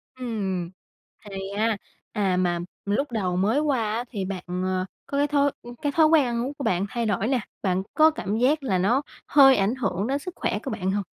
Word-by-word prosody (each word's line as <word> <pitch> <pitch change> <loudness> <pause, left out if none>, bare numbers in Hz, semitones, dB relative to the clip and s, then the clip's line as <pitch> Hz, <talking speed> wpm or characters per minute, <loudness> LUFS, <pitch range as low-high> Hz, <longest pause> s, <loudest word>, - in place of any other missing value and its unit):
Ừm, 200 -8 -3 0.6
thì 195 -1 -6
á, 220 0 +1 0.3
à, 190 -3 +1
mà 175 -1 +1 0.3
lúc 245 +7 0
đầu 185 -5 -1
mới 215 +9 +2
qua 260 -8 0
á 235 - -1
thì 200 -5 -3
bạn, 185 -1 -5 0.2
ờ, 185 0 0 0.2
có 280 - -3
cái 290 +1 +3
thói 285 -1 +2 0.3
cái 290 - 0
thói 315 +2 +5
quen 310 -3 +5
ăn 235 0 -1
uống 275 - -4
của 280 - -7
bạn 185 -2 +1
thay 235 +2 -2
đổi 210 0 0
nè, 260 0 +2 0.2
bạn 190 -1 0
có 315 0 +6
cảm 210 - -3
giác 280 +5 +2
là 195 -8 +1
nó 220 +9 +2 0.3
hơi 270 -2 +7
ảnh 205 +3 +1
hưởng 210 -6 -1
đến 275 +2 0
sức 365 +4 -7
khỏe 205 - -1
của - - -4
bạn 190 -4 -1
hông? 200 +1 -1
220 Hz, 220 wpm, -25 LUFS, 195-275 Hz, 0.6 s, hơi